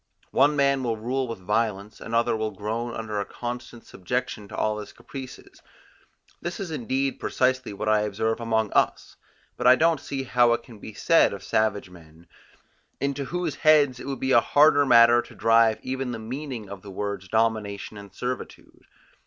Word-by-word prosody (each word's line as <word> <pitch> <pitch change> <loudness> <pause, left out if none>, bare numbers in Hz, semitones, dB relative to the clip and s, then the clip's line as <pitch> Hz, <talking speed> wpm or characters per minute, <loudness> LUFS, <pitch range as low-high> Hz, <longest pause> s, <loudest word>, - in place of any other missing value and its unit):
One 150 +1 +4
man 140 -1 +2
will 115 -3 -1
rule 130 +4 -2
with 115 - -5
violence, 105 +1 -2
another 115 0 0
will 110 0 -2
groan 110 +4 -4
under 110 -2 -4
a - - 0
constant 120 -1 -7
subjection 105 +2 -4
to - - -9
all 105 0 -1
his 105 - -9
caprices: 130 -2 -11 0.8
this 170 0 -5
is 190 -4 -5
indeed 135 0 -2
precisely 130 -1 0
what 105 +2 -5
I 110 0 +4
observe 110 +2 -1
among 110 -2 0
us, - - 0 0.4
but 125 - +1
I 125 - +9
don't 160 +2 +2
see 135 -1 -4
how 120 -2 +3
it 120 - -2
can 115 -5 -14
be 110 0 -10
said - - +4
of - - -8
savage 105 -3 0
men, 80 -1 -17 0.7
into 140 0 -2
whose 175 +1 -3
heads 145 -5 +4
it - - -8
would 135 -1 -4
be 130 - -1
a 120 - +6
harder 145 +1 +4
matter 120 -1 +7
to - - -15
drive 115 0 +4
even 130 -1 -3
the - - -4
meaning 125 0 -6
of 100 -1 -9
the 100 - -11
words 100 0 -4
domination 110 -2 -1
and 100 -1 -11
servitude. 125 0 -7
115 Hz, 180 wpm, -25 LUFS, 105-130 Hz, 0.8 s, I